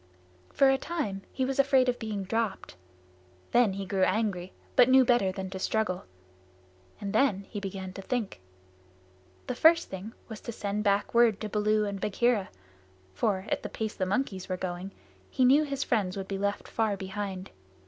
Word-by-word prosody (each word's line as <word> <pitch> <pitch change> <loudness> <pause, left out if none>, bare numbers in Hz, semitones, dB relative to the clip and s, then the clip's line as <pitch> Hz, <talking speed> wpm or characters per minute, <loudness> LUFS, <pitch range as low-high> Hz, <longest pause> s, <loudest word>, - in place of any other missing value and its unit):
For 275 -1 +5
a 270 - +1
time 280 - -3
he 260 - -1
was 270 +1 -2
afraid 270 -2 +4
of 250 -1 0
being 210 -3 -3
dropped. 215 - -2 0.8
Then 240 -5 +4
he 195 0 -4
grew 190 0 -1
angry 185 -2 +1 0.2
but 250 0 +6
knew 260 0 +7
better 240 -6 +3
than 190 0 -6
to 190 - -5
struggle, 200 -2 -1 0.9
and 200 -1 -4
then 215 -5 +2
he 205 - -3
began 190 -1 -6
to 195 - -7
think. 220 - -3 1.0
The - - -2
first 330 +6 +5
thing 195 +4 -6
was 220 -2 -8
to 235 - -5
send 210 -1 -3
back 200 0 +1
word 235 -3 +4
to 215 - -3
Baloo 210 0 +2
and 200 -1 -4
Bagheera, 215 -1 +1 0.6
for, 190 - 0
at - - 0
the - - -5
pace 220 -1 -3
the 185 - -2
monkeys 195 -3 -2
were 185 - -1
going, 180 +1 -4 0.4
he 260 - +2
knew 275 +4 +6
his 280 -1 -2
friends 190 -3 0
would 190 -1 -4
be 195 -1 -3
left 200 0 -2
far 220 -3 0
behind. 190 0 -5
205 Hz, 180 wpm, -29 LUFS, 190-240 Hz, 1.0 s, knew